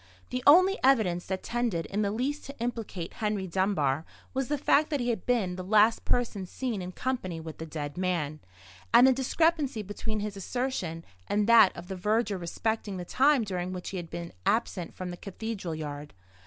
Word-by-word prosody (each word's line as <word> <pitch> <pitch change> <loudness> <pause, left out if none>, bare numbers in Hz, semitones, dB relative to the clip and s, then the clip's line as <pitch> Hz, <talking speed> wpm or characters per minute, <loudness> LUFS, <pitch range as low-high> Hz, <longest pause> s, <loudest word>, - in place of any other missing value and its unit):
The 250 0 -1
only 370 +6 +7
evidence 215 -10 +3
that 190 0 -3
tended 235 -9 -1
in 205 +2 -2
the 200 - +1
least 260 +8 -2
to 280 -1 -10
implicate 225 -7 -4
Henry 210 -3 0
Dunbar 170 -6 +1 0.3
was 265 -1 -1
the 295 - 0
fact 295 +2 +3
that 290 - 0
he 245 -1 +1
had 220 -6 -5
been 205 -8 +1
the 185 - -4
last 215 +3 +4
person 215 -6 0
seen 235 -1 -3
in 180 0 -5
company 185 -7 -3
with 160 -1 -8
the 160 - -5
dead 150 0 -5
man, 165 -5 -1 0.5
and 245 - +8
the 265 - +6
discrepancy 275 -2 +1
between 210 +2 -4
his 205 0 -4
assertion 195 -6 -3 0.2
and 205 0 +1
that 230 -4 +7
of 175 - -8
the 190 - -4
verger 210 +1 0
respecting 205 +3 -2
the 180 - -5
time 275 +4 +3
during 185 -2 -3
which 180 -1 -5
he 195 - -5
had 170 -2 -6
been 170 0 -6
absent 205 -6 0
from 185 -1 -5
the 175 - -7
cathedral 200 -3 -5
yard. 145 -3 -6
205 Hz, 195 wpm, -29 LUFS, 180-245 Hz, 0.5 s, and